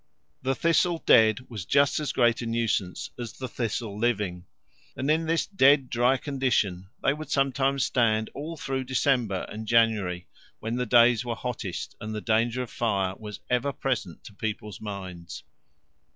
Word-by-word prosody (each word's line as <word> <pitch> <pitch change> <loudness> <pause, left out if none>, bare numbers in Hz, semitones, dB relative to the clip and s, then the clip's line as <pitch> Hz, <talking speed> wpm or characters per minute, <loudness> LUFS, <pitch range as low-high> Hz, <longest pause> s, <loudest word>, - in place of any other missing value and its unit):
The 135 +1 0
thistle 170 +1 +2
dead 110 0 +5
was 110 -6 -6
just 140 +10 +3
as 150 - -2
great 120 -2 +2
a 120 - -4
nuisance 115 -5 -1
as 120 -2 -5
the 130 - -6
thistle 115 -3 -3
living, 105 -6 -1 0.5
and 140 +3 0
in 160 +1 +1
this 165 0 +1
dead 140 -8 +4
dry 120 +3 +3
condition 120 -10 -1
they 140 - +3
would 155 +1 -8
sometimes 135 0 +1
stand 110 -3 +1
all 160 +3 -6
through 135 -2 -3
December 125 -6 +1
and 110 +1 -7
January 105 -7 +2 0.3
when 115 +2 -3
the 125 -1 -1
days 120 0 +5
were 120 -1 -3
hottest 110 -7 -5
and 110 0 -5
the - - -2
danger 115 +3 +1
of 120 - -10
fire 100 -5 0
was 105 -1 -9
ever 125 +3 +1
present 115 - -3
to 105 - -12
people's 105 -2 -5
minds. 95 -5 -7
120 Hz, 165 wpm, -27 LUFS, 105-135 Hz, 0.5 s, dead